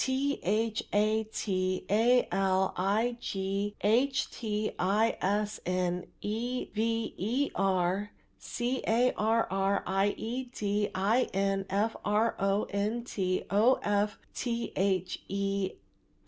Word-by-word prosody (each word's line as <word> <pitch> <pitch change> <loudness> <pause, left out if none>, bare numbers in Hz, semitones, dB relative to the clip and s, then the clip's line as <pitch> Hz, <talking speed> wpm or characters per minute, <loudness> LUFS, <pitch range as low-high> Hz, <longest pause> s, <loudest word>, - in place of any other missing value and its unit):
t. 270 +2 0
h. 215 +3 0
a. 215 +1 +2
t. 185 -3 -2
a. 235 +5 +4
l. 190 -1 +2
i. 215 +6 +1
g. 195 +1 -2
h. 250 +6 +2
t. 215 -2 -2
i. 210 +5 +2
s. 205 +2 0
n. 180 0 -1
e. 240 +4 -2
v. 225 +1 0
e. 245 +9 0
r. 190 +1 +1 0.3
c. 245 - -2
a. 240 +3 +4
r. 225 +2 +1
r. 195 +1 +1
i. 195 +1 +2
e. 245 +4 -3
d. 205 0 0
i. 210 +7 +2
n. 195 0 0
f. 210 +4 +1
r. 215 +2 +2
o. 195 +2 +2
n. 210 +4 -1
t. 185 -5 -1
o. 220 +6 +4
f. 205 0 +1 0.2
t. 235 -1 -3
h. 185 -2 0
e. 195 -1 -1
205 Hz, 135 wpm, -30 LUFS, 195-230 Hz, 0.3 s, a